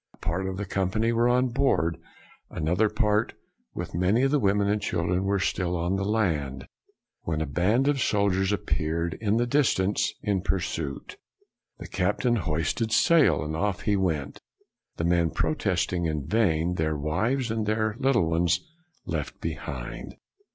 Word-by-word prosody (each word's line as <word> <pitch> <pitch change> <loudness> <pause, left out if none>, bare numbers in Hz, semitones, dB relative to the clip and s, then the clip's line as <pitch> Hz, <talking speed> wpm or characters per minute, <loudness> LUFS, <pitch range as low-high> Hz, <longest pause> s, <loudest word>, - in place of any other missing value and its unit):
A - - -33
part 90 +3 -2
of 95 0 -4
the 100 - -3
company 95 +4 0
were 115 +1 +2
on 125 +1 +3
board, 120 -10 +1 0.5
an 75 - -4
other 95 +6 +3
part, 105 -1 +1 0.4
with - - -5
many 95 +8 +2
of 135 - +2
the 150 - +3
women 100 -2 +2
and 105 +1 +1
children, 90 +2 -1
were 100 0 +1
still 90 -2 -1
on 85 +3 0
the 95 - -1
land, 80 -11 -1 0.6
when 80 -2 -2
a 80 - -1
band 100 - +1
of 145 -1 +2
soldiers 100 -3 +1
appeared 85 -3 -1
in 110 0 +1
the 120 - +2
distance 120 -7 +1
in 100 -3 0
pursuit. 80 -7 -3 0.6
The - - -9
captain 120 -1 0
hoisted 80 +6 -1
sail, 125 - +4
and 75 +1 -4
off 95 +1 -1
he 105 - +1
went, 80 -8 -2 0.6
the 85 - -1
men 85 -1 +2
protesting 90 - 0
in 75 -3 -3
vain, 90 -3 +1
their 80 -2 0
wives 110 - -1
and 110 -2 -2
little 110 0 +1
ones 85 +1 +2 0.5
left - - -4
behind. - - -6
95 Hz, 160 wpm, -26 LUFS, 85-110 Hz, 0.6 s, sail